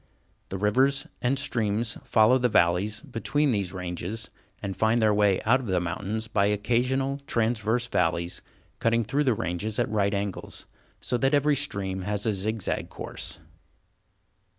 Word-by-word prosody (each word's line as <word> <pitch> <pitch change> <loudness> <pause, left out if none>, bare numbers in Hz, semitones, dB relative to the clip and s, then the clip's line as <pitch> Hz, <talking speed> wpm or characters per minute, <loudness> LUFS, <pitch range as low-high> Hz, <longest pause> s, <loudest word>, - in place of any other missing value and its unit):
The 95 - -3
rivers 130 +8 +2 0.2
and 130 +3 +1
streams 115 -5 0
follow 115 +4 +4
the 125 0 +2
valleys 100 +3 +2
between 145 +5 0
these 100 -5 -1
ranges, 90 +4 -5 0.3
and 100 -2 -4
find 110 +2 +2
their 110 -2 +4
way 105 -2 +3
out 120 +4 +4
of 125 - -7
the 95 -2 +1
mountains 100 +6 -3
by 100 -2 +2
occasional, 125 +6 0
transverse 115 +1 +1
valleys, 85 -5 0 0.4
cutting 115 0 +2
through 140 +7 0
the 125 -4 +3
ranges 95 +5 -2
at - - +1
right 100 -1 +1
angles, 100 -1 -4 0.4
so 125 - -1
that 135 +3 +3
every 145 +1 +3
stream 100 -9 -2
has 100 +2 -1
a 110 - +2
zig 105 +2 -2
zag - - -2
course. - - -6
110 Hz, 155 wpm, -27 LUFS, 100-125 Hz, 0.4 s, follow